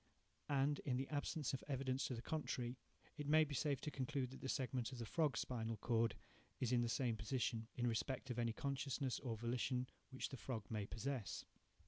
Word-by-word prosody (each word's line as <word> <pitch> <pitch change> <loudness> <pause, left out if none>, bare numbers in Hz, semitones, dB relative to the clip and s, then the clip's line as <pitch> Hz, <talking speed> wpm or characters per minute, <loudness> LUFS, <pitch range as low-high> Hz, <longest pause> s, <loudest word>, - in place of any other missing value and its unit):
And, 140 +1 +3
in 125 -3 0
the 135 +1 0
absence 150 0 0
of 135 - -2
evidence 135 -1 +1
to 125 - -1
the 115 - -5
contrary, 125 -5 -1 0.4
it 145 - -2
may 155 +1 +7
be 150 -1 -3
safe 140 -1 +2
to 150 - -2
conclude 130 -1 -1
that 135 - -9
the 135 - -2
segment 130 -3 0
of 130 - -5
the 115 - -3
frog's 145 -1 +2
spinal 115 -2 -1
cord 115 +2 +3 0.4
is 125 -2 +1
in 120 -1 +5
the 120 - +1
same 120 -1 +2
position, 115 0 0
in 120 - +1
respect 125 +3 0
of 120 - -1
any 115 -1 +3
consciousness, 135 0 0
or 120 -5 -2
volition, 125 +2 +1 0.2
which 130 - -2
the 135 - -5
frog 115 -3 -3
may 105 -2 0
possess. 115 -2 -2
130 Hz, 200 wpm, -43 LUFS, 115-140 Hz, 0.4 s, may